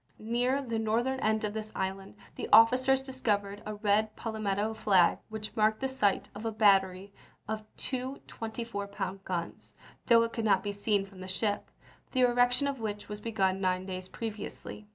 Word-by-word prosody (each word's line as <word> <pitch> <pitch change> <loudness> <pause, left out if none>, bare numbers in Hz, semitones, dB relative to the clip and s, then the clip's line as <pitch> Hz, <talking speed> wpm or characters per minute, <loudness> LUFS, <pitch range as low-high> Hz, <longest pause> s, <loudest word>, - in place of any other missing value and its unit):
Near 245 +5 0
the 230 -3 -2
northern 235 +4 0
end 220 -1 +1
of 210 -1 -2
this 215 0 -5
island, 190 +1 -4 0.2
the - - -6
officers 255 +4 +6
discovered 210 -7 -2
a 215 - -4
red 210 +1 +1
palmetto 215 -1 -2
flag 195 -5 +3
which 215 -1 -5
marked 215 0 +2
the 265 - 0
site 235 -7 +1
of 205 - -8
a 225 - -1
battery 195 -2 +3 0.3
of 215 0 -3
two 260 +1 -3
24 225 -2 -5
pound 195 -1 -5
guns 170 -2 -5 0.3
(though 230 -1 +6
it 230 - -3
could 230 - -2
not 195 -3 +3
be 205 - -2
seen 205 0 0
from 195 -1 -15
the 185 - -7
ship), 205 +2 -1 0.4
the 255 - +2
erection 245 +2 +4
of 280 -2 -2
which 210 -2 -5
was 210 0 -5
begun 195 -4 0
nine 185 0 0
days 185 -1 -5
previously. 215 0 -7
215 Hz, 175 wpm, -30 LUFS, 200-230 Hz, 0.4 s, officers